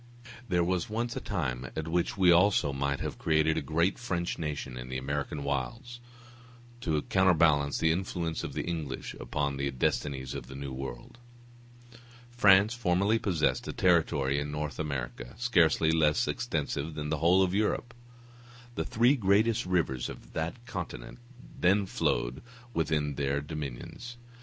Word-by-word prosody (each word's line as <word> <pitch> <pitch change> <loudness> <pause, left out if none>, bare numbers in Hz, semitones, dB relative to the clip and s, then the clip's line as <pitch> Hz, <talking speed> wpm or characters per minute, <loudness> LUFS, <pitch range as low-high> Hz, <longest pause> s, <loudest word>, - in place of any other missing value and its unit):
There 90 -2 +3
was 90 +1 -1
once 115 +2 -2
a - - -2
time 65 - -3
at 80 0 -3
which 85 +4 0
we 90 -2 +6
also 85 -5 +4
might 70 +1 -1
have - - -4
created 80 0 +2
a 80 - 0
great 80 +6 0
French 90 -7 -2
nation 75 -5 -4
in 60 0 -7
the 65 - -3
American 70 +2 -3
wilds, 115 - -3 0.8
to 80 -8 -1
counterbalance 80 -6 +3
the 80 - +3
influence 85 -2 -2
of - - -5
the - - -2
English 80 -6 -4
upon 70 +3 -2
the 70 0 -1
destinies 65 0 -1
of 65 -3 -6
the 65 - -9
New 70 -1 -5
World. 65 - -7 1.1
France 105 -2 +5
formerly 105 -1 +2
possessed 85 -8 0
a - - -3
territory 75 -6 +2
in 75 0 -3
North 75 -2 -4
America, - - -4
scarcely 85 -9 +3
less 80 +9 +3
extensive 80 -8 -2
than 75 -1 -4
the 80 - -1
whole 90 +4 +5
of 90 -1 0
Europe. 110 +3 0 0.8
The - - -2
three 120 +3 +3
greatest 105 -2 +2
rivers 80 -9 0
of - - -11
that 85 +10 -4
continent 95 0 -6 0.4
then 100 +3 +3
flowed - - -1 0.3
within 75 -4 0
her 70 0 0
dominions. 75 - -7
80 Hz, 150 wpm, -29 LUFS, 70-95 Hz, 1.1 s, we